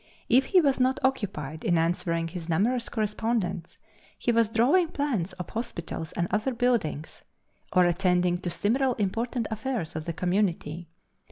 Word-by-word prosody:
If 255 +3 +5
he 375 - +4
was 275 -4 +2
not 260 +1 +2
occupied 160 - -1
in 170 - +2
answering 165 0 0
his 175 -1 -7
numerous 230 +9 +1
correspondents 215 -5 -2 0.4
he 240 - +1
was 230 -2 +3
drawing 265 +11 +3
plans 260 - -2
of 180 -2 -7
hospitals 170 -8 -4
and 175 - -1
other 225 +5 0
buildings, 230 -11 -1 0.5
or 180 -1 +5
attending 180 0 +2
to 180 - -3
similar 240 +8 +1
important 230 +4 -1
affairs 220 -7 -3
of 155 -1 -4
the 170 - -3
Community. 175 -3 -1
205 Hz, 150 wpm, -27 LUFS, 170-240 Hz, 0.5 s, If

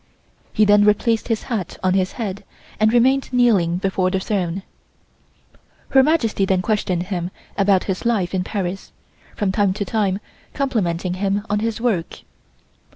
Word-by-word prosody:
He 215 - +3
then 205 0 +5
replaced 210 +2 +2
his 225 -2 -1
hat 220 -9 -4
on 185 0 +2
his 185 -1 0
head 200 -4 -5 0.4
and 215 0 +4
remained 260 +3 +3
kneeling 210 -9 +3
before 190 -1 0
the 190 0 0
throne. 190 -2 -2 1.3
Her 270 - +6
Majesty 260 -9 +1
then 190 -1 +1
questioned 185 -5 0
him 180 -2 -3 0.3
about 195 -2 +3
his 190 -2 -3
life 210 -7 0
in 185 -1 0
Paris, 190 -1 -4 0.4
from 205 -3 0
time 195 -1 +2
to 205 +1 -3
time 195 -1 0 0.4
complimenting 185 - -1
him 200 +1 0
on 210 - +2
his 225 +1 -2
work. 220 -9 -1
200 Hz, 155 wpm, -21 LUFS, 185-225 Hz, 1.3 s, Her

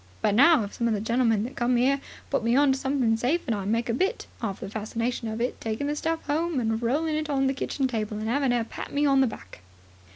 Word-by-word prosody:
But 205 - +3
now, 280 +3 +6
if 200 - -7
some 235 - -1
of 225 - +1
the - - -2
gentlemen 225 -1 +1
that 255 +4 -6
come 240 +1 +1
'ere 270 +3 +2 0.3
put 275 -5 +1
me 235 +1 +2
on 280 0 +5
to 265 - +1
something 265 -4 +1
safe 270 +9 +1
and 235 - 0
I 200 -2 -4
make 230 +4 0
a 230 - 0
bit, 375 - -1 0.2
'arf 200 -5 -3
the - - -4
fascination 225 +3 -3
of 220 +1 -4
it 245 +2 +1
is - - -14
taking 225 +5 -3
the 295 +1 -1
stuff 320 +1 -2
'ome 315 +1 0
and 225 -1 -1
rolling 300 +7 0
it 310 0 -2
on 275 -2 +1
to 270 - +3
the - - 0
kitchen 270 0 -1
table 215 -3 -3
and 215 +1 -4
'aving 270 +2 +1
'er 240 -1 +1
pat - - -8
me 290 +1 +1
on 275 -1 +4
the 265 - +4
back." 90 - -9
245 Hz, 280 wpm, -26 LUFS, 225-280 Hz, 0.3 s, now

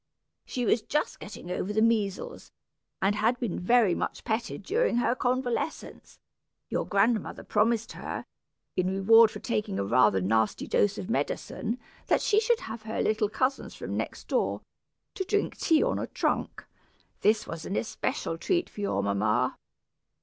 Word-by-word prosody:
"She 250 -1 -2
was 225 - +3
just 300 +7 -2
getting 200 -3 -8
over 185 +2 -2
the 215 - +1
measles, 215 -4 0 0.5
and 195 +2 +3
had 220 +4 +1
been 225 -8 -2
very 215 0 +4
much - - -3
petted 220 -2 -2
during 445 - +1
her 240 0 +2
convalescence. 255 +2 -2 0.5
Your - - -1
grandmother 210 +1 +1
promised 225 +2 +1
her, - - -6 0.5
in 185 0 +1
reward 220 +4 +6
for - - -8
taking 210 -3 -2
a - - 0
rather 105 -3 +4
nasty 110 +4 +1
dose 205 - +2
of 185 - -5
medicine, 235 - -2 0.3
that - - +2
she 425 - +4
should 460 +1 +2
have 220 0 -6
her 220 +1 -4
little 215 -1 +1
cousins 255 +5 -1
from - - -5
next - - -4
door, - - 0 0.5
to 380 - -2
drink 410 +2 0
tea 320 -3 +3
on - - 0
a - - -3
trunk. - - -2 0.5
This 215 +1 +3
was 165 -1 -6
an 195 - -3
especial 165 -6 -2
treat 350 - 0
to 205 - -7
your 100 - 0
mamma. 105 +5 +1
220 Hz, 160 wpm, -28 LUFS, 190-245 Hz, 0.5 s, reward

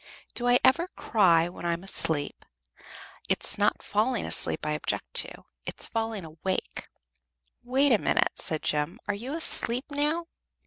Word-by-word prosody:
Do 245 - -2
I 245 0 +6
ever 330 +7 +4
cry 170 -6 +3
when 175 - -10
I 170 0 0
am 170 +2 -6
asleep? 160 -6 0 0.9
It's - - +2
not - - +1
falling 220 +3 0
asleep - - +1
I 150 - -1
object 150 - -3
to, - - -9 0.2
it's - - -1
falling 225 -5 -3
awake." 160 +4 -4 0.7
"Wait 265 +3 +2
a 225 - +5
minute," - - +1
said 155 -1 -3
Jem. 150 +8 -1
"Are 205 - 0
you 245 +9 -5
asleep 255 -5 +1
now?" 300 +4 0
215 Hz, 150 wpm, -27 LUFS, 170-255 Hz, 0.9 s, I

